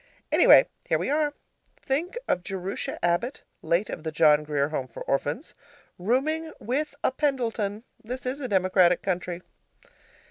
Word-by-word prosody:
Anyway, -, -, +7 dB, 0.2 s
here -, -, +2 dB
we -, -, -2 dB
are. 295 Hz, -1 st, +1 dB, 0.4 s
Think 330 Hz, -, -2 dB
of 180 Hz, -, +1 dB
Jerusha 190 Hz, 0 st, -4 dB
Abbott, 175 Hz, +11 st, 0 dB, 0.2 s
late 175 Hz, +5 st, +1 dB
of -, -, -6 dB
the 160 Hz, 0 st, -4 dB
John 150 Hz, -1 st, +5 dB
Grier 145 Hz, -1 st, 0 dB
Home 135 Hz, -4 st, -3 dB
for 115 Hz, -, -8 dB
Orphans, 145 Hz, -, -2 dB, 0.5 s
rooming 300 Hz, -, 0 dB
with 285 Hz, +6 st, -2 dB
a -, -, +3 dB
Pendleton. 235 Hz, -7 st, -1 dB, 0.2 s
This 250 Hz, +3 st, -6 dB
is 260 Hz, +3 st, -2 dB
a 265 Hz, -, -3 dB
democratic 185 Hz, -3 st, +3 dB
country. 180 Hz, -1 st, -2 dB
205 Hz, 145 wpm, -26 LUFS, 170-270 Hz, 0.5 s, Anyway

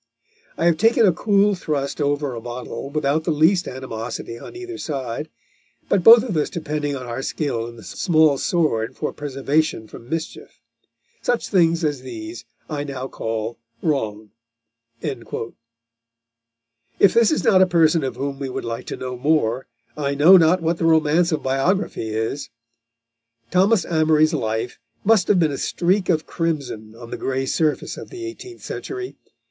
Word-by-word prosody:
I 165 Hz, -, 0 dB
have 170 Hz, -2 st, +4 dB
taken 225 Hz, -, +4 dB
a 190 Hz, -, +6 dB
cool 205 Hz, +3 st, +3 dB
thrust 150 Hz, -5 st, -3 dB
over 145 Hz, -1 st, 0 dB
a 115 Hz, -, -6 dB
bottle, 125 Hz, +3 st, -6 dB
without 150 Hz, +1 st, 0 dB
the 170 Hz, -, -2 dB
least 165 Hz, +4 st, +3 dB
animosity 115 Hz, -2 st, -6 dB
on -, -, -11 dB
either 365 Hz, -1 st, -7 dB
side, 140 Hz, 0 st, -4 dB, 0.6 s
but 190 Hz, -, +2 dB
both 230 Hz, +2 st, +9 dB
of 225 Hz, -8 st, -3 dB
us 150 Hz, -, +1 dB
depending 150 Hz, -3 st, -3 dB
on 130 Hz, -2 st, -6 dB
our 120 Hz, +2 st, -4 dB
skill 130 Hz, -5 st, -2 dB
in 120 Hz, -, -10 dB
the 115 Hz, -, -13 dB
small 155 Hz, -, +2 dB
sword 130 Hz, -8 st, 0 dB
for 150 Hz, -, -3 dB
preservation 140 Hz, -3 st, -1 dB
from 115 Hz, +2 st, -12 dB
mischief. 165 Hz, 0 st, -5 dB, 0.6 s
Such 245 Hz, -1 st, -1 dB
things 170 Hz, -3 st, +3 dB
as 145 Hz, -4 st, -1 dB
these 325 Hz, -, -8 dB, 0.2 s
I 145 Hz, -2 st, -3 dB
now 135 Hz, -2 st, -5 dB
call 115 Hz, +1 st, -4 dB, 0.2 s
wrong." 110 Hz, -9 st, -2 dB, 0.7 s
If 120 Hz, -4 st, -5 dB, 1.6 s
this 230 Hz, -2 st, +5 dB
is 310 Hz, -, 0 dB
not 185 Hz, -2 st, +5 dB
a 185 Hz, -, +6 dB
person 165 Hz, -3 st, +3 dB
of 130 Hz, -2 st, -3 dB
whom 135 Hz, +1 st, -4 dB
we 135 Hz, -2 st, -3 dB
would -, -, -5 dB
like 115 Hz, 0 st, -5 dB
to -, -, -5 dB
know 130 Hz, 0 st, -5 dB
more, 130 Hz, -3 st, +1 dB, 0.3 s
I 140 Hz, -2 st, -1 dB
know 160 Hz, +7 st, +8 dB
not 170 Hz, 0 st, +5 dB
what 165 Hz, +1 st, 0 dB
the 165 Hz, -, 0 dB
romance 165 Hz, +2 st, +3 dB
of 155 Hz, -, -1 dB
biography 135 Hz, -, 0 dB
is. 110 Hz, +6 st, -3 dB, 1.0 s
Thomas 190 Hz, +1 st, +3 dB
Amory's 155 Hz, -1 st, +3 dB
life 115 Hz, -3 st, -2 dB, 0.2 s
must 215 Hz, -3 st, +4 dB
have 195 Hz, -, +4 dB
been 160 Hz, -3 st, +2 dB
a 140 Hz, -, -4 dB
streak 185 Hz, +2 st, 0 dB
of 160 Hz, -3 st, +2 dB
crimson 140 Hz, -10 st, -3 dB
on 115 Hz, 0 st, -11 dB
the -, -, -4 dB
grey 135 Hz, 0 st, -2 dB
surface 155 Hz, +2 st, -1 dB
of -, -, -9 dB
the 360 Hz, -2 st, -7 dB
eighteenth 355 Hz, +1 st, -9 dB
century. 385 Hz, -1 st, -6 dB
150 Hz, 165 wpm, -22 LUFS, 130-175 Hz, 1.6 s, both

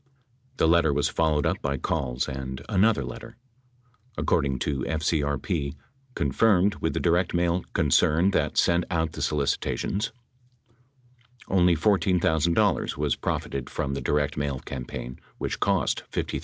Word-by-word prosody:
The -, -, +3 dB
letter 85 Hz, -2 st, +4 dB
was 70 Hz, +1 st, +1 dB
followed 80 Hz, -3 st, +1 dB
up -, -, 0 dB
by 70 Hz, 0 st, -1 dB
calls 65 Hz, -3 st, -2 dB
and 65 Hz, -1 st, -6 dB
another 105 Hz, -4 st, +3 dB
letter. 60 Hz, -, -9 dB, 0.8 s
According 70 Hz, -1 st, +1 dB
to 70 Hz, -2 st, -1 dB
FCRP, 75 Hz, -1 st, -1 dB, 0.4 s
confirmed 100 Hz, -3 st, +3 dB
with 80 Hz, -, -1 dB
the -, -, +1 dB
direct 85 Hz, +1 st, +1 dB
mail 85 Hz, +1 st, +1 dB
concern 80 Hz, +3 st, +3 dB
that -, -, 0 dB
sent 85 Hz, +1 st, +3 dB
out 80 Hz, -3 st, 0 dB
the 75 Hz, -, -7 dB
solicitations, 75 Hz, +8 st, -1 dB, 1.4 s
only 90 Hz, -2 st, +4 dB
$14,000 85 Hz, -3 st, +2 dB
was -, -, 0 dB
profited 70 Hz, -2 st, -3 dB
from 70 Hz, -, -3 dB
the 70 Hz, -, -3 dB
direct 75 Hz, +3 st, 0 dB
mail 70 Hz, -2 st, -2 dB
program 65 Hz, -2 st, -6 dB, 0.2 s
which -, -, -3 dB
cost -, -, +1 dB
$53,000. -, -, -2 dB
80 Hz, 130 wpm, -26 LUFS, 70-85 Hz, 1.4 s, letter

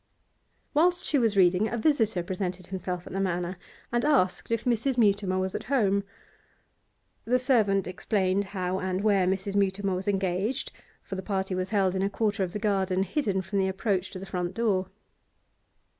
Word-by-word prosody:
Whilst 350 Hz, +4 st, +3 dB
she 290 Hz, -, +2 dB
was 225 Hz, -4 st, +1 dB
reading 185 Hz, +3 st, +4 dB
a 235 Hz, -, -2 dB
visitor 225 Hz, -, +2 dB
presented 185 Hz, 0 st, -4 dB
himself 180 Hz, -1 st, -4 dB
at -, -, -9 dB
the 195 Hz, -, -2 dB
Manor, 180 Hz, -1 st, -1 dB, 0.3 s
and 240 Hz, 0 st, +1 dB
asked 275 Hz, -12 st, +2 dB
if 230 Hz, 0 st, -1 dB
Mrs. 245 Hz, +2 st, +1 dB
Mutimer 200 Hz, -4 st, +2 dB
was 185 Hz, 0 st, -1 dB
at 215 Hz, -, -4 dB
home. 205 Hz, -6 st, +2 dB, 1.2 s
The 250 Hz, +2 st, +3 dB
servant 220 Hz, -7 st, +2 dB
explained 190 Hz, +2 st, 0 dB
how 185 Hz, -1 st, -2 dB
and 185 Hz, +1 st, -2 dB
where 200 Hz, -4 st, +3 dB
Mrs. 195 Hz, +1 st, -1 dB
Mutimer 195 Hz, 0 st, +1 dB
was 185 Hz, +2 st, -3 dB
engaged, 195 Hz, +5 st, -1 dB, 0.3 s
for -, -, -8 dB
the 190 Hz, -, -3 dB
party 190 Hz, -1 st, -2 dB
was 185 Hz, +1 st, -2 dB
held 195 Hz, -4 st, +2 dB
in 190 Hz, -, -1 dB
a 195 Hz, -, +1 dB
quarter 205 Hz, 0 st, -1 dB
of 180 Hz, -, -4 dB
the -, -, -2 dB
garden 195 Hz, -3 st, +1 dB
hidden 195 Hz, -, -1 dB
from 195 Hz, +2 st, -2 dB
the 190 Hz, -, +2 dB
approach 190 Hz, -1 st, -1 dB
to -, -, -8 dB
the 190 Hz, -, -7 dB
front 180 Hz, -1 st, -3 dB
door. 195 Hz, -5 st, +1 dB
195 Hz, 180 wpm, -27 LUFS, 185-215 Hz, 1.2 s, reading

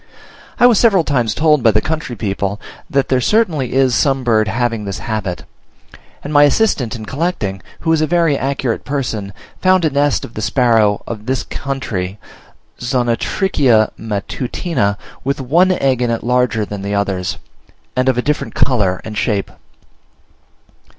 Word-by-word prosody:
I -, -, +6 dB
was 240 Hz, -4 st, +5 dB
several 200 Hz, -7 st, +4 dB
times 125 Hz, -7 st, 0 dB
told 150 Hz, -2 st, +3 dB
by 115 Hz, -, +5 dB
the 105 Hz, 0 st, +3 dB
country 155 Hz, -1 st, -3 dB
people 100 Hz, -1 st, -2 dB, 0.3 s
that 140 Hz, -1 st, 0 dB
there 130 Hz, -1 st, +2 dB
certainly 160 Hz, -, +1 dB
is 130 Hz, -2 st, +3 dB
some 135 Hz, +4 st, +1 dB
bird 110 Hz, -3 st, +2 dB
having 115 Hz, 0 st, -1 dB
this 100 Hz, -1 st, -4 dB
habit; 105 Hz, -5 st, -4 dB, 0.8 s
and 145 Hz, -, -5 dB
my 145 Hz, -, +6 dB
assistant 145 Hz, -, +2 dB
in 110 Hz, -2 st, -7 dB
collecting, 130 Hz, -, -2 dB, 0.2 s
who 165 Hz, 0 st, +2 dB
is 160 Hz, -, +2 dB
a 155 Hz, -, +2 dB
very 165 Hz, -2 st, +2 dB
accurate 135 Hz, -3 st, -2 dB
person, 120 Hz, -8 st, -3 dB, 0.3 s
found 185 Hz, -2 st, +4 dB
a 155 Hz, -, +1 dB
nest 145 Hz, 0 st, +1 dB
of 115 Hz, -, -13 dB
the 110 Hz, -, -5 dB
sparrow 110 Hz, -5 st, +2 dB
of 110 Hz, -1 st, -7 dB
this 130 Hz, 0 st, 0 dB
country 105 Hz, -9 st, -4 dB, 0.6 s
(Zonotrichia 120 Hz, -, +1 dB
matutina), 110 Hz, -, -2 dB, 0.3 s
with 140 Hz, +1 st, -1 dB
one 165 Hz, +8 st, +3 dB
egg 135 Hz, -8 st, +1 dB
in 120 Hz, -, +1 dB
it 115 Hz, -1 st, -2 dB
larger 125 Hz, -3 st, +1 dB
than 105 Hz, -1 st, -6 dB
the 100 Hz, +1 st, -2 dB
others, 95 Hz, -4 st, -1 dB, 0.6 s
and 130 Hz, +1 st, +2 dB
of 130 Hz, -, +1 dB
a 125 Hz, -, 0 dB
different 150 Hz, 0 st, -2 dB
colour 100 Hz, -9 st, +1 dB
and 110 Hz, -, -7 dB
shape. 105 Hz, -2 st, -1 dB
125 Hz, 160 wpm, -17 LUFS, 105-145 Hz, 0.8 s, I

